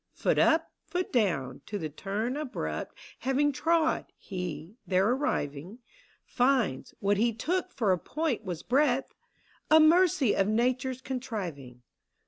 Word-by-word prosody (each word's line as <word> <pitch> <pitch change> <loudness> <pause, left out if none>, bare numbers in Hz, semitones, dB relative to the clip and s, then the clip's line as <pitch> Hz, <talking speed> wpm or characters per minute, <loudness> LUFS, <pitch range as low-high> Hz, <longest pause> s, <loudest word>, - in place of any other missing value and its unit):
Foot - - +1
up, 325 0 +3 0.2
foot 360 +1 -3
down, 140 - 0
to 205 - -3
the 160 - -3
turn 205 - -3
abrupt 80 - -4 0.2
Having 275 +3 +1
trod, 320 +2 +1
he, 180 -1 -6
there 190 +1 +3
arriving, 195 - -2 0.5
Finds 245 - +1
— - - -47
what 200 0 +2
he 230 +3 +3
took 360 +11 -2
for 220 -7 +1
a 180 - +2
point 300 - -2
was 180 -5 -5
breadth, 270 0 +1 0.6
A 315 - +7
mercy 315 - +5
of 195 - +2
Nature's 255 +3 0
contriving. 185 - -5
235 Hz, 135 wpm, -29 LUFS, 185-280 Hz, 0.6 s, A